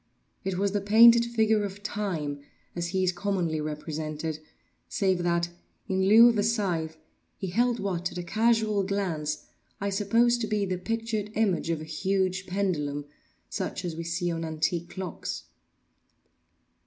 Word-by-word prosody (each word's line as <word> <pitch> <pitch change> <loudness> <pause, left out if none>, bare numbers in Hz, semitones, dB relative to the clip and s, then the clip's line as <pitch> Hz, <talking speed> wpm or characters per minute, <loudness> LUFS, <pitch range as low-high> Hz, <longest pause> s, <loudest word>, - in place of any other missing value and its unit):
It 190 -2 -2
was 200 +1 +1
the 205 0 0
painted 230 +3 +7
figure 220 -2 +2
of 200 0 -6
Time 170 -10 -3 0.4
as 170 0 -2
he 185 +2 0
is 185 - +3
commonly 175 -4 -1
represented, 155 0 -4 0.5
save 190 -3 +1
that, 170 0 +1 0.4
in 190 0 +1
lieu 225 +3 +9
of 230 -3 +1
a - - +3
scythe, 180 -8 0 0.4
he 190 -2 -4
held 240 +4 +2
what, 180 -3 -2
at - - -8
a 175 - -3
casual 220 +2 +2
glance, 175 -7 -2 0.3
I 200 0 -1
supposed 230 +4 +3
to 220 - -1
be 210 -1 0
the 185 -1 -2
pictured 225 0 -2
image 200 -6 +1
of 165 -2 -1
a - - -5
huge 190 +3 -1
pendulum 150 -7 -1 0.4
such 185 - -4
as 170 -2 -3
we 165 - -4
see 175 +1 -1
on 165 0 -3
antique 165 +2 -1
clocks. 185 -3 -5
190 Hz, 155 wpm, -27 LUFS, 170-210 Hz, 0.5 s, lieu